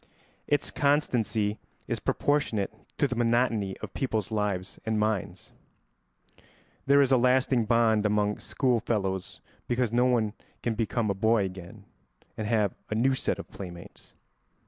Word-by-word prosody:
Its 145 - +1
constancy 115 -7 +1 0.3
is - - -2
proportionate 145 -9 0 0.2
to 145 - +3
the 125 - -3
monotony 115 -4 +1
of 100 - -6
people's 110 -6 -2
lives 100 -4 -2
and 110 -1 0
minds. 105 -3 -2 1.3
There 140 +1 +6
is 135 - 0
a 130 - +6
lasting 125 -1 +3
bond 115 -2 +3
among 105 0 +1
schoolfellows 110 -7 -1 0.3
because 120 -2 0
no 120 +1 +4
one 115 -4 +2 0.3
can 120 - 0
become 110 -1 0
a - - +1
boy 110 +1 +2
again 90 -2 -9 0.5
and 110 - -4
have 105 -3 +2 0.2
a 110 - -1
new 130 +4 +3
set 130 - -1
of - - -8
playmates. 85 -3 -10
110 Hz, 140 wpm, -28 LUFS, 105-125 Hz, 1.3 s, There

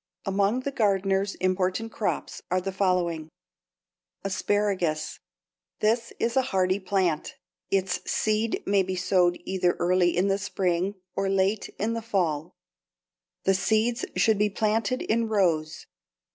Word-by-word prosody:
Among 200 +5 +1
the 280 - -3
gardener's 195 -4 +1
important 185 +4 0
crops 215 - -3
are 185 - +2
the 195 +1 -3
following: 180 -4 0 0.9
=Asparagus.= 195 -5 0 0.6
This 230 +2 +1
is 235 0 -1
a 265 - +5
hardy 190 -6 +1
plant. 185 -5 0 0.3
Its 190 -1 +1
seed 220 +1 0
may 200 0 +3
be 185 0 -2
sowed 180 -1 +2
either 180 -2 +1
early 175 0 +2
in 185 +2 +3
the 195 0 +1
spring 190 -1 -1 0.2
or 195 0 0
late 195 +2 +1
in 220 +3 -1
the 230 - -3
fall. 175 -7 -1 0.9
The 195 - +3
seeds 220 +4 +1
should 220 -2 +3
be 210 0 +3
planted 220 +4 0
in 230 +1 +1
rows. 170 -7 0
195 Hz, 130 wpm, -26 LUFS, 185-215 Hz, 0.9 s, a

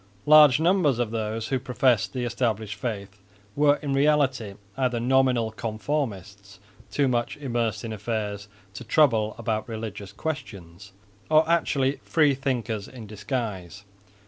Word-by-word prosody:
Large 150 -2 +7
numbers 165 -6 +3
of 120 -3 -1
those 110 0 -3
who 130 - 0
professed 125 -3 +1
the 125 -2 -3
established 115 -3 -1
faith 100 -3 -6 0.4
were 145 0 +4
in 140 -2 -1
reality 135 -7 +1 0.2
either 125 -3 0
nominal 125 -2 +2
conformists 110 -4 -4 0.3
too 140 -2 +1
much 120 -2 -1
immersed 120 -6 -2
in 110 - -4
affairs 105 -1 -4 0.3
to 110 - -8
trouble 110 -4 +2
about 110 0 -3
religious 110 -3 -6
questions, 100 - -7 0.4
or 155 0 +4
actually 140 -5 +1
free 150 -3 +3
thinkers 125 -6 -3
in 125 -4 -10
disguise. 105 -3 -5
120 Hz, 130 wpm, -25 LUFS, 105-135 Hz, 0.4 s, Large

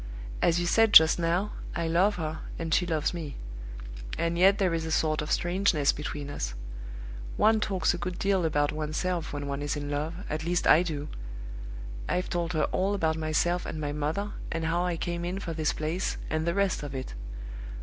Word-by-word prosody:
"As 170 0 +4
you 175 - 0
said 225 +4 +4
just 160 +2 +9
now, 175 +5 +1 0.2
I 170 - 0
love 185 +5 +3
her, 155 -3 -3 0.2
and 165 -1 -2
she 180 - +3
loves 160 -1 0
me; 160 -5 -5 0.8
and 170 0 0
yet 190 +3 +6
there 190 -4 +2
is 165 -1 0
a 160 - -3
sort 155 -1 +2
of 150 - -4
strangeness 175 -5 +3
between 145 -1 -5
us. - - -3 0.8
One 220 +1 +5
talks 195 -4 +1
a 175 - -4
good 175 +1 -3
deal 195 -2 +2
about 145 -2 +2
one's 155 0 -3
self 180 -3 -1
when 145 -1 -4
one 140 0 -3
is 145 0 -1
in 145 0 -4
love, 150 +3 -2
at 155 +1 -3
least 175 +1 0
I 160 - +7
do. 155 -4 -3 1.0
I've 180 +1 0
told 175 -1 -1
her 155 - +2
all 195 +2 +1
about 160 -4 +1
myself 160 +3 +1
and 155 - -5
my 145 -1 -2
mother, 155 +8 -1 0.2
and 165 0 -1
how 170 +2 +1
I 175 -2 -1
came 170 +1 -2
in 180 +2 -2
for 175 -4 -4
this 155 -2 +1
place, 160 +4 -2
and 155 +1 0
the 170 - +1
rest 200 -2 +1
of 145 -2 -5
it. 130 - -5
165 Hz, 205 wpm, -28 LUFS, 155-180 Hz, 1.0 s, just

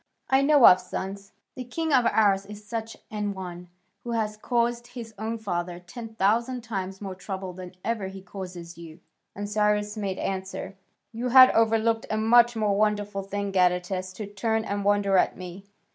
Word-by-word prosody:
I 265 +1 +5
know 285 -2 +6
of 185 0 +8
sons 195 +2 -6 0.2
this 255 -2 -7
king 320 +3 -1
of 250 -3 +5
ours 200 -2 +3
is 210 0 -10
such 225 +1 -5
an 210 -2 -2
one, 180 -2 -7 0.4
who 240 - -4
has 215 -2 -1
caused 240 +1 -1
his 230 -3 -9
own 225 +1 -3
father 175 -5 -3
ten 225 +5 -10
thousand 235 +5 +1
times 195 -4 -5
more 195 -2 -5
trouble 190 0 -6
than 185 0 -10
ever 225 -4 -1
he 190 0 -9
causes 180 -3 -8
you." 165 0 -11 0.4
And 205 +1 -4
Cyrus 210 0 +1
made 195 -3 -3
answer: 190 +1 -4 0.4
"You 235 +2 -3
have 255 +1 +9
overlooked 225 0 +2
a 215 - 0
much 240 +2 +5
more 210 -2 +1
wonderful 205 -1 0
thing, 200 +1 -4
Gadatas, 185 0 +1
to 210 +3 -6
turn 220 +2 -1
and 200 0 -2
wonder 200 -1 +3
at - - +1
me." 185 +1 -9
205 Hz, 175 wpm, -26 LUFS, 190-225 Hz, 0.4 s, have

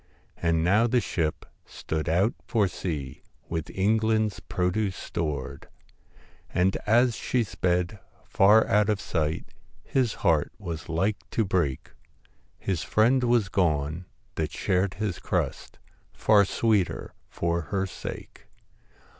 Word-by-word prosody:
And 85 -1 +1
now 100 +7 +4
the 125 +1 +3
ship 80 -8 -2 0.2
stood 80 -1 -4
out 95 +8 +2
for 110 -5 +2
sea, 75 -7 -5 0.3
With 80 -2 -3
England's 110 +2 +1
produce 95 +2 -1
stored; 70 -4 -4 0.8
And 90 +2 +1
as 120 +2 +4
she 120 +1 0
sped 90 -1 -1 0.3
far 105 +3 +5
out 105 +1 +3
of 105 -2 +1
sight, 80 -3 -2 0.3
His 125 -5 0
heart - - +3
was 80 -2 -6
like 95 +6 +1
to 110 - 0
break; 85 -9 -1 0.7
His 95 -5 -2
friend 120 +7 +3
was 120 -4 +3
gone 85 -2 0 0.3
that - - -2
shared 95 +1 0
his 100 -4 -3
crust, - - -3 0.4
Far 105 -2 +4
sweeter 105 -3 0 0.2
for 85 0 -1
her 95 -1 0
sake. 95 - -8
95 Hz, 120 wpm, -26 LUFS, 85-110 Hz, 0.8 s, far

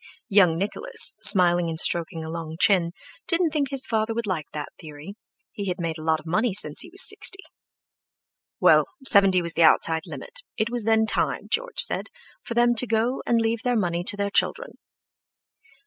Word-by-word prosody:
Young 185 -6 +3
Nicholas, 445 - 0
smiling 175 -5 +4
and 160 -1 -3
stroking 165 -1 +1
a - - -7
long 165 -1 -7
chin, 180 -5 +2 0.4
didn't 335 -2 0
think 290 -3 -2
his 270 -1 -3
father 220 0 -2
would 235 0 -3
like 175 -7 -4
that 150 -1 -6
theory; 155 +2 -11 0.4
he 200 -1 -7
had 180 0 -4
made 165 -2 -4
a - - -9
lot 160 0 0
of 155 - -17
money 210 +5 -1
since 150 -7 +2
he 350 - -9
was 385 +3 +2
sixty. 390 -1 0 1.2
Well, - - +4 0.2
seventy 195 -6 +6
was 170 0 -2
the 170 - -1
outside 160 0 +2
limit; - - -10 0.2
it 225 +1 -2
was 240 -3 -4
then 220 0 +2
time, 220 - -3
George - - -1
said, 485 - -2 0.3
for 235 - -7
them 240 0 +3
to 250 - +1
go 230 +3 -1
and 235 - +2
leave 225 0 -1
their 245 -1 -1
money 175 -4 -2
to 205 - 0
their 200 0 -2
children. - - +1
205 Hz, 190 wpm, -23 LUFS, 170-240 Hz, 1.2 s, seventy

